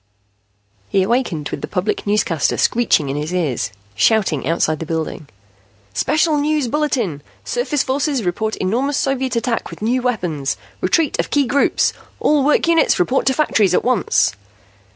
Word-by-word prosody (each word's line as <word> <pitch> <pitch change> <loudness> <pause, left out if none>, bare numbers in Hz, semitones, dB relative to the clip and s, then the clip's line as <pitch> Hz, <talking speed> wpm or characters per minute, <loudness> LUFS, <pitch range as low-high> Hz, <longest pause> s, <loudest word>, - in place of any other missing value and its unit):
He 195 -1 +2
awakened 195 - -1
with 140 - -5
the - - -4
public 200 +2 -2
newscaster 200 -7 +1
screeching 230 -11 +2
in 135 - -2
his 150 +3 -3
ears, 150 - -1 0.2
shouting 155 - +2
outside 155 -2 +1
the 165 - -4
building. 160 -2 -4 0.7
"Special 310 - +1
news 300 -2 0
bulletin! 240 - -1 0.2
Surface 470 - 0
forces 275 -1 -1
report 215 +5 -1
enormous 255 +9 -1
Soviet 265 -2 -1
attack 230 0 -1
with - - -9
new 250 +3 +1
weapons! 175 - -2 0.2
Retreat 320 -5 +1
of - - 0
key 285 -1 +2
groups! 280 +3 +2 0.3
All 295 -2 +2
work 300 +3 +2
units 335 -1 +3
report 250 +11 +1
to 265 - +3
factories 215 -11 +2
at - - +1
once!" 245 - +2
230 Hz, 150 wpm, -19 LUFS, 170-275 Hz, 0.7 s, units